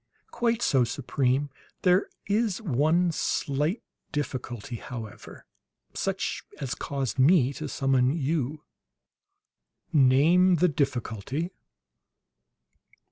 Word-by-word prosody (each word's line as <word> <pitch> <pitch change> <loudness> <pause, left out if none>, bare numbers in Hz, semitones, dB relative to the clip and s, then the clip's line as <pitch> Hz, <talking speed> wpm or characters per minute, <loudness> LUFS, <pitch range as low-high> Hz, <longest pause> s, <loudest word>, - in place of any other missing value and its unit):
"Quite 235 0 0
so, 130 -3 +4
Supreme. 135 +2 0 0.3
There 185 +1 +4 0.2
is 210 -1 0
one 170 - +2
slight 150 - -1 0.3
difficulty, 125 -5 -4
however, 110 -3 -9 0.5
such - - -2 0.2
as 130 -3 -3
caused 135 -2 -3
me 140 -1 +5
to 150 +1 -6
summon 135 -2 +2
you." 150 0 -1 1.3
"Name 160 +7 +5
the 180 +2 +3
difficulty." 135 - -2
140 Hz, 85 wpm, -27 LUFS, 130-170 Hz, 1.3 s, me